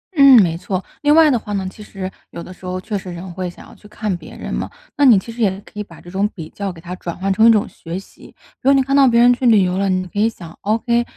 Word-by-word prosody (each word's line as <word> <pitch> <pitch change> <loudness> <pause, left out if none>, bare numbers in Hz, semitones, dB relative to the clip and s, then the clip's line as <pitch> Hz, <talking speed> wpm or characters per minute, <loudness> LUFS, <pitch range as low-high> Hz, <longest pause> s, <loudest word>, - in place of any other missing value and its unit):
嗯， 275 -4 +8
没 165 -2 -1
错。 185 +2 -4 0.2
另 295 0 +4
外 320 -2 +6
的 245 - +1
话 210 - -7
呢， 195 -2 -2
其 215 - -14
实 195 -2 -7 0.2
有 170 - -8
的 185 - -10
时 185 - -15
候 180 0 -3
确 210 +3 -5
实 190 -2 -5
人 175 +1 -8
会 185 0 -4
想 175 - -14
要 - - -15
去 210 - -17
看 210 -2 -3
别 170 -2 -11
人 - - -6
嘛， - - -3 0.3
那 290 - +1
你 240 -6 +7
其 210 +5 -4
实 235 +1 -7
也 210 - +4
可 210 - -12
以 - - -2
把 - - -15
这 175 - -13
种 195 +2 0
比 160 -5 -8
较 200 -1 -5
给 170 - -13
它 175 +2 -7
转 170 -2 -6
换 195 +2 0
成 220 +4 +5
一 - - +8
种 215 -2 +3
学 165 +2 -7
习。 195 - -13 0.3
如 270 - +2
果 - - +6
你 275 - +4
看 275 +1 0
到 275 -1 +6
别 235 -1 +4
人 245 +1 +6
去 250 +1 -3
旅 215 -4 +5
游 180 0 -1
了， 195 0 0
你 185 0 0
可 205 - -5
以 220 +2 +3
想 170 -7 -12
：“ok， 235 +3 +1
200 Hz, 340 characters per minute, -19 LUFS, 185-235 Hz, 0.3 s, 嗯